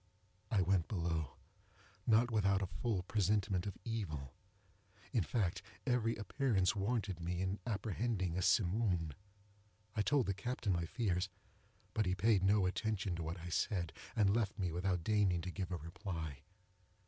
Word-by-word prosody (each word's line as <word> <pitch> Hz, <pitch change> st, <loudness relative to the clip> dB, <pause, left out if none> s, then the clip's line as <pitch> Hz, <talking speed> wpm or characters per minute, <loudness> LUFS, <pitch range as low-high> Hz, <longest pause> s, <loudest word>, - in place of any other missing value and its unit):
I 105 Hz, -6 st, +3 dB
went 90 Hz, -2 st, +2 dB
below—not 85 Hz, -, -1 dB
without 100 Hz, -3 st, +3 dB
a 90 Hz, -2 st, -4 dB
full 110 Hz, -7 st, +1 dB
presentiment 100 Hz, -1 st, +1 dB
of 100 Hz, -, -5 dB
evil. 80 Hz, -, -3 dB, 0.8 s
Indeed, 95 Hz, -, +1 dB, 0.2 s
every 120 Hz, -3 st, +2 dB
appearance 105 Hz, -3 st, +1 dB
warranted 100 Hz, -3 st, -1 dB
me 85 Hz, +1 st, -2 dB
in 95 Hz, +2 st, -1 dB
apprehending 100 Hz, -3 st, -1 dB
a 95 Hz, -, 0 dB
Simoom. 90 Hz, -5 st, +2 dB, 0.8 s
I 105 Hz, -, +2 dB
told 135 Hz, +3 st, +3 dB
the 100 Hz, -, 0 dB
captain 110 Hz, 0 st, -1 dB
my 85 Hz, -1 st, 0 dB
fears; 95 Hz, -1 st, 0 dB, 0.6 s
but 110 Hz, -3 st, +1 dB
he 90 Hz, -, +2 dB
paid 105 Hz, 0 st, +4 dB
no 100 Hz, +1 st, +4 dB
attention 95 Hz, -1 st, -1 dB
to -, -, -3 dB
what 85 Hz, +3 st, -4 dB
I 90 Hz, -, -6 dB
said, 85 Hz, 0 st, 0 dB, 0.2 s
and 100 Hz, -1 st, +4 dB
left 110 Hz, -4 st, 0 dB
me 90 Hz, -4 st, 0 dB
without 90 Hz, 0 st, 0 dB
deigning 100 Hz, -3 st, +3 dB
to 90 Hz, -, -4 dB
give 95 Hz, -1 st, -4 dB
a 90 Hz, -, -1 dB
reply. 80 Hz, -, -5 dB
95 Hz, 150 wpm, -37 LUFS, 90-110 Hz, 0.8 s, paid